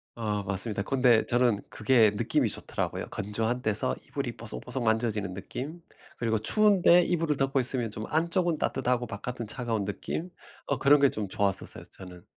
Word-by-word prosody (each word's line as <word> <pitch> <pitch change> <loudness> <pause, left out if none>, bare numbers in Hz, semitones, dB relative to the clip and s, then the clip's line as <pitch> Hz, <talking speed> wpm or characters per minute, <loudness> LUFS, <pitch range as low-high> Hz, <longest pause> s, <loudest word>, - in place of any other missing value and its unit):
어 105 -3 -2
맞습니다. 100 +2 -1
근데 125 -1 +3
저는 120 -4 +2
그게 110 -2 +3
느낌이 - - +1
좋더라고요. - - -2
건조한 110 +5 -1
데서 105 - 0
이불이 - - -4
뽀송뽀송 120 - -5
만져지는 110 -4 0
느낌. 145 - -7 0.4
그리고 115 -2 0
추운데 185 - +5
이불을 165 -5 0
덮고 135 0 +1
있으면 125 -3 0
좀 110 +1 -6
안쪽은 170 +1 +1
따뜻하고 125 -3 0
바깥은 115 +2 -5
차가운 115 -3 -3
느낌. 155 - -5 0.4
어 - - -1
그런 145 +1 +5
게 140 - +5
좀 105 -2 -3
좋았었어요, 100 0 0
저는. 90 0 -12
115 Hz, 380 characters per minute, -28 LUFS, 105-135 Hz, 0.4 s, 추운데